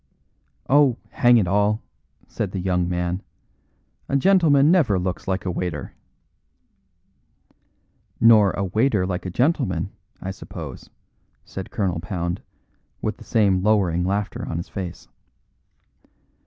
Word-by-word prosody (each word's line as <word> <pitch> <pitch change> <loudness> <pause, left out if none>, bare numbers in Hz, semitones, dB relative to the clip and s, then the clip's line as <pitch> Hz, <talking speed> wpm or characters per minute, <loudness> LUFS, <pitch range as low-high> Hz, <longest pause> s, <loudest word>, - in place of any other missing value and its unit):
"Oh, 135 -3 +4
hang 120 -1 +5
it 105 - +3
all!" 105 +3 +2 0.5
said 100 -4 -4
the 95 - -2
young 90 -1 0
man, 90 +1 -2 0.9
"a 140 - +2
gentleman 155 -3 +4
never 145 - +3
looks 90 0 -3
like 95 0 -1
a 90 - 0
waiter." 85 -4 -4 2.3
"Nor 110 -3 +6
a 100 - -2
waiter 105 +1 +1
like 90 0 -3
a - - -3
gentleman, 100 - 0 0.3
I 95 - -4
suppose," 95 - -9 0.6
said 95 - -7
Colonel 95 -8 -1
Pound, 85 0 -3 0.6
with - - -3
the - - -12
same 100 -4 +2
lowering 95 -5 +2
laughter 100 +2 -2
on 80 - -3
his 85 - -5
face. 90 -3 -6
95 Hz, 125 wpm, -23 LUFS, 90-115 Hz, 2.3 s, Nor